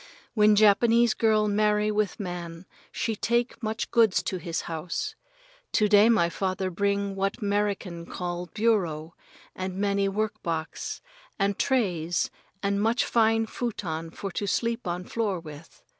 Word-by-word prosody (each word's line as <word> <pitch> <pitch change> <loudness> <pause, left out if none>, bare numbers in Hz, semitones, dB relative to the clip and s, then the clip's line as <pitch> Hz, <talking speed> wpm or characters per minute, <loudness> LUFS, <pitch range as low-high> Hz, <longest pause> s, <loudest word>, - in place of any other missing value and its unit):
When 210 -1 +5
Japanese 225 +3 +5
girl 215 -2 +2
marry 210 0 +2
with 210 0 -1
man 175 -2 -6 0.3
she 225 - -2
take 235 +3 0
much 220 0 -3
goods 225 -4 +4
to 185 - -2
his 170 -1 -3
house. 170 - -4 0.6
To 210 - +4
day 205 +2 +6
my 205 -7 +4
father 185 +2 -2
bring 200 +1 0
what 195 0 -1
'Merican 200 -4 -1
call 175 -1 -4
bureau, 175 -8 0 0.4
and 185 0 -4
many 200 0 +1
work 215 +1 -2
box 160 -1 -4 0.4
and 200 0 +1
trays 175 - 0 0.3
and 200 0 +1
much 225 +3 +2
fine 225 -1 +3
futon 175 -9 -4
for 195 +4 -6
to 200 +3 -3
sleep 230 +1 -1
on 175 +1 -2
floor 205 -2 -2
with. 155 -1 -12
200 Hz, 145 wpm, -27 LUFS, 180-215 Hz, 0.6 s, day